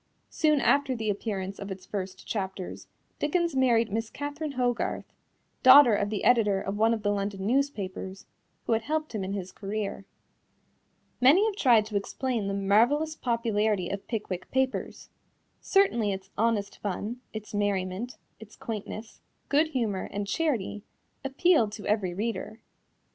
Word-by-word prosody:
Soon 305 Hz, -2 st, +3 dB
after 280 Hz, -1 st, +2 dB
the 220 Hz, -2 st, -1 dB
appearance 195 Hz, -2 st, -4 dB
of 200 Hz, -, -6 dB
its 190 Hz, -1 st, -7 dB
first 190 Hz, -2 st, -5 dB
chapters, 190 Hz, -3 st, -4 dB, 0.3 s
Dickens 335 Hz, +1 st, 0 dB
married 235 Hz, -4 st, +3 dB
Miss 225 Hz, +1 st, -2 dB
Catherine 290 Hz, +2 st, -5 dB
Hogarth, 245 Hz, -2 st, -1 dB, 0.6 s
daughter 260 Hz, -2 st, +9 dB
of 205 Hz, 0 st, +1 dB
the 210 Hz, -1 st, -3 dB
editor 210 Hz, -5 st, +4 dB
of 195 Hz, +1 st, -3 dB
one 220 Hz, +2 st, +3 dB
of 225 Hz, -2 st, -1 dB
the 205 Hz, -, +2 dB
London 200 Hz, -1 st, -2 dB
newspapers, 200 Hz, -7 st, -2 dB, 0.4 s
who -, -, +1 dB
had 225 Hz, -, +2 dB
helped 310 Hz, +3 st, -2 dB
him 210 Hz, -3 st, -2 dB
in 190 Hz, +1 st, -3 dB
his 190 Hz, -2 st, -4 dB
career. 200 Hz, -1 st, -4 dB, 1.2 s
Many 300 Hz, +12 st, +6 dB
have 435 Hz, -3 st, -1 dB
tried 235 Hz, -, +4 dB
to 215 Hz, -1 st, -7 dB
explain 230 Hz, +1 st, -2 dB
the 195 Hz, -, -1 dB
marvelous 240 Hz, +11 st, +3 dB
popularity 220 Hz, -, 0 dB
of 200 Hz, 0 st, -5 dB
Pickwick 190 Hz, -5 st, -4 dB
Papers. 265 Hz, 0 st, -2 dB, 0.5 s
Certainly 240 Hz, -, +2 dB
its 190 Hz, 0 st, -8 dB
honest 215 Hz, -2 st, 0 dB
fun, 210 Hz, +5 st, -4 dB
its 215 Hz, -1 st, -8 dB
merriment, 205 Hz, +2 st, -1 dB, 0.2 s
its 220 Hz, -1 st, -13 dB
quaintness, 220 Hz, -3 st, -7 dB, 0.3 s
good 300 Hz, +3 st, +4 dB
humor 230 Hz, -10 st, -2 dB
and 205 Hz, 0 st, -3 dB
charity 230 Hz, -5 st, -1 dB, 0.4 s
appealed 275 Hz, -4 st, +3 dB
to 210 Hz, -, -8 dB
every 200 Hz, -4 st, 0 dB
reader. 220 Hz, +2 st, -3 dB
220 Hz, 150 wpm, -28 LUFS, 200-260 Hz, 1.2 s, daughter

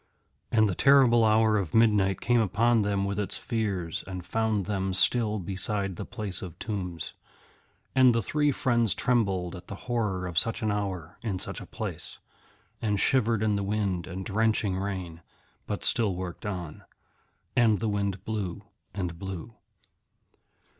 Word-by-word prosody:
And 110 Hz, -1 st, +4 dB
the 100 Hz, -, -1 dB
terrible 130 Hz, 0 st, +5 dB
hour 110 Hz, 0 st, +4 dB
of 90 Hz, -6 st, -4 dB
midnight 105 Hz, -4 st, +3 dB
came 120 Hz, 0 st, +3 dB
upon 115 Hz, +3 st, +3 dB
them 100 Hz, -1 st, 0 dB
with 100 Hz, +1 st, -2 dB
its 105 Hz, -, -2 dB
fears, 100 Hz, -8 st, -2 dB
and 90 Hz, -2 st, -6 dB
found 110 Hz, -3 st, 0 dB
them 95 Hz, -2 st, -1 dB
still 110 Hz, +1 st, +3 dB
beside 95 Hz, +1 st, -1 dB
the -, -, -6 dB
place 105 Hz, -6 st, -4 dB
of 90 Hz, -4 st, -8 dB
tombs. 90 Hz, -6 st, -4 dB, 0.8 s
And 130 Hz, -2 st, +6 dB
the 115 Hz, -, +1 dB
three 150 Hz, +6 st, +1 dB
friends 120 Hz, -5 st, +2 dB
trembled 95 Hz, -8 st, 0 dB
at 90 Hz, -, -11 dB
the 100 Hz, -, -6 dB
horror 105 Hz, -7 st, -1 dB
of 85 Hz, -3 st, +1 dB
such 115 Hz, +3 st, 0 dB
an 110 Hz, -, +1 dB
hour 95 Hz, -4 st, -4 dB
in 105 Hz, -6 st, -2 dB
such -, -, -1 dB
a -, -, -9 dB
place, -, -, -5 dB, 0.6 s
and 105 Hz, -3 st, 0 dB
shivered 115 Hz, -3 st, +2 dB
in 105 Hz, -1 st, +2 dB
the 100 Hz, -, -1 dB
wind 100 Hz, -4 st, -1 dB
and 95 Hz, 0 st, -6 dB
drenching 110 Hz, -2 st, +1 dB
rain, 95 Hz, -4 st, -4 dB, 0.5 s
but -, -, -3 dB
still 105 Hz, -5 st, +2 dB
worked 90 Hz, +1 st, -6 dB
on. 90 Hz, -6 st, -5 dB, 0.7 s
And 115 Hz, -3 st, +4 dB
the 110 Hz, -, -2 dB
wind 100 Hz, -2 st, -2 dB
blew 105 Hz, -5 st, -3 dB, 0.3 s
and 90 Hz, -4 st, -3 dB
blew. 95 Hz, +3 st, -6 dB
100 Hz, 160 wpm, -28 LUFS, 95-110 Hz, 0.8 s, And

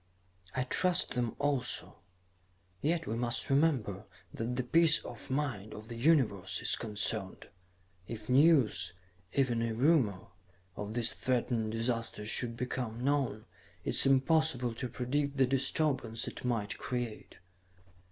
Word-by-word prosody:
"I 130 Hz, -, +1 dB
trust 180 Hz, +7 st, +2 dB
them 120 Hz, -2 st, -1 dB
also 140 Hz, -4 st, -2 dB, 0.9 s
yet 165 Hz, +2 st, 0 dB
we 110 Hz, -, -2 dB
must 120 Hz, +2 st, -1 dB
remember 130 Hz, -, +1 dB, 0.3 s
that 115 Hz, +2 st, -3 dB
the 130 Hz, -, -1 dB
peace 165 Hz, +4 st, +5 dB
of -, -, -8 dB
mind 130 Hz, -7 st, -2 dB
of 110 Hz, +2 st, -10 dB
the 120 Hz, -, -6 dB
Universe 115 Hz, -, +2 dB
is -, -, +1 dB
concerned. 105 Hz, -2 st, -3 dB, 0.6 s
If 110 Hz, -2 st, -7 dB
news, 125 Hz, -, +4 dB, 0.4 s
even 125 Hz, -4 st, +1 dB
a 115 Hz, -1 st, -1 dB
rumor, 125 Hz, -, +3 dB, 0.5 s
of 105 Hz, +2 st, -5 dB
this 120 Hz, -1 st, +1 dB
threatened 120 Hz, -3 st, -1 dB
disaster 115 Hz, -2 st, -2 dB
should 115 Hz, +2 st, -2 dB
become 125 Hz, -2 st, -3 dB
known, 130 Hz, -6 st, 0 dB, 0.4 s
it -, -, -1 dB
is -, -, +6 dB
impossible 135 Hz, -2 st, +2 dB
to 125 Hz, +2 st, -5 dB
predict 140 Hz, +3 st, -2 dB
the 135 Hz, -, +5 dB
disturbance 130 Hz, -3 st, 0 dB
it -, -, -7 dB
might 115 Hz, -5 st, -2 dB
create. 120 Hz, -3 st, -5 dB
125 Hz, 135 wpm, -32 LUFS, 110-140 Hz, 0.9 s, is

